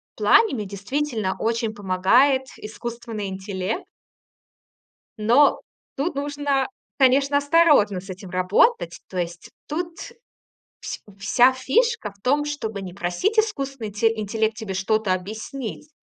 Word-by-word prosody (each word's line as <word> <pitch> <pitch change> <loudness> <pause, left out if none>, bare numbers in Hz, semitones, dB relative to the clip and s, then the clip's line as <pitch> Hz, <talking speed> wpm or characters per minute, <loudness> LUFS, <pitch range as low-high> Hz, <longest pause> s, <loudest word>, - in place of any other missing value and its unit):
плане 445 -10 +4
мне 210 -4 -3
действительно 205 +1 -2
очень 230 -1 -1
помогает 205 +8 +3
искусственный 225 -1 -6
интелле 190 - -4 1.4
Но 240 +7 +4 0.3
тут 300 +4 -2
нужно, 285 -1 -1 0.3
конечно, 275 +1 +4
осторожно 285 - +4
с 195 +2 -13
этим 185 0 -8
работать. 185 - +2
То 185 - -7
есть 175 -1 -4 0.2
тут 335 +2 -4 0.8
вс - - -6 0.2
вся 240 +6 +4
фишка 420 - 0
в 200 - -29
том, 285 +3 +2
чтобы 225 -9 -4
не 185 -2 -7
просить 200 - -1
искусственный 275 - 0
инте 225 +2 +1
интеллект 220 +1 -1
тебе 220 -4 -5
что-то 200 +1 +1
объяснить, 220 +8 -6
225 Hz, 120 wpm, -23 LUFS, 200-285 Hz, 1.4 s, плане